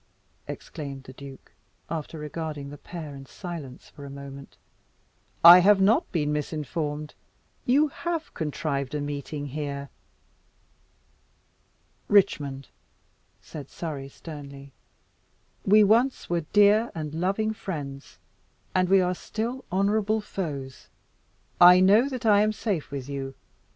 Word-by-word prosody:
exclaimed 140 -4 -7
the 130 - -12
duke, 135 0 -12 0.4
after 160 0 -5
regarding 150 -2 -5
the 145 - -9
pair 160 -4 -8
in 135 -1 -9
silence 145 -1 -8
for 145 - -13
a 140 - -8
moment, 140 0 -10 0.9
"I 175 +2 +12
have 200 +2 +5
not 220 - +3
been 150 -3 0
misinformed. 150 0 -3 0.5
You 290 +5 +4
have 335 +2 -4
contrived 150 -3 -3
a - - -1
meeting 145 0 -4
here." 140 -1 -5 2.2
"Richmond," 145 -10 +2 0.7
said 145 -3 -9
Surrey 145 -5 -6
sternly, 140 -2 -10 1.0
"we 210 +2 +7
once 235 +6 +2
were 170 -2 0
dear 210 +2 +5
and 155 -2 -5
loving 195 +6 0
friends, 145 -9 -7 0.6
and 185 -1 +2
we 195 0 +6
are 180 0 +1
still 235 +7 -4
honourable 210 +3 +1
foes. 145 -10 -6 0.7
I 180 +1 +10
know 210 +8 +5
that 255 -4 -5
I 205 -2 +6
am 215 0 +2
safe 200 -8 -2
with 140 -2 -6
you. 135 -1 -5
160 Hz, 120 wpm, -26 LUFS, 140-200 Hz, 2.2 s, I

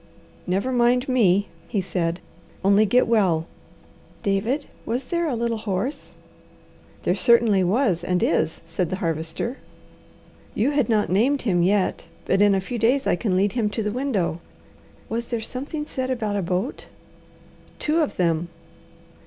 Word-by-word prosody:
"Never 195 +8 0
mind 245 +1 +2
me!" 205 -6 +3 0.2
he 205 - -1
said. 175 -2 -2 0.4
"Only 200 +2 +5
get 245 +5 +4
well." 185 -8 +2 0.8
"David, 220 +9 0 0.2
was 245 +4 -2
there 340 +5 -1
a 270 - -1
little 230 -1 -1
horse?" 215 +7 -3 0.9
"There - - +2
certainly 230 -5 +4
was 190 -2 +1
and 180 0 0
is," 160 -1 +1
said 165 +1 -2
the 185 - -1
Harvester. 165 - -3 1.0
"You 240 +7 +2
had 285 -6 +1
not 210 -4 +2
named 255 +9 +2
him 180 -7 +2
yet, 190 +2 +1 0.2
but 195 - +2
in 205 -1 +5
a 190 - 0
few 235 +5 -5
days 255 +5 +2
I - - +3
can 185 -1 0
lead 200 +1 +2
him 220 -1 0
to 220 +1 -3
the 210 - -1
window." 215 - -1 0.7
"Was 235 +1 -3
there 235 - -2
something 275 +7 -5
said 260 -3 -3
about 220 -5 -1
a 200 - 0
boat?" 185 - -3 0.9
"Two 310 +2 +1
of 300 - -1
them." 170 -1 0
210 Hz, 155 wpm, -23 LUFS, 185-250 Hz, 1.0 s, Only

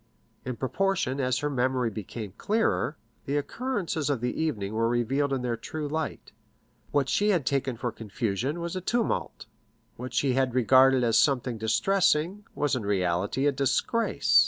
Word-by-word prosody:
In 130 -1 -3
proportion 140 0 0
as 130 -1 +1
her 150 - -1
memory 125 -2 0
became 105 0 -6
clearer, 215 -7 0 0.3
the 140 +2 0
occurrences 180 - -2
of 140 -4 0
the 125 +1 -1
evening 110 -11 -2
were 115 +1 +1
revealed 135 +4 0
in 130 -2 -1
their 120 -1 0
true 150 +7 -5
light; 155 +1 -4 0.6
what 145 -2 +1
she 205 +9 +2
had 175 -9 +2
taken 130 -3 0
for 120 +1 -2
confusion 115 - -3
was 170 +1 -4
a 185 - -3
tumult; 235 +5 -1 0.5
what 125 0 -6
she 130 +2 +2
had 130 -1 +1
regarded 130 +1 +5
as 115 -1 +4
something 125 -5 +1
distressing, 180 - +1
was 145 -2 +1
in 125 - -3
reality 100 +5 0
a 145 - +4
disgrace. 140 - +2
130 Hz, 160 wpm, -27 LUFS, 120-155 Hz, 0.6 s, regarded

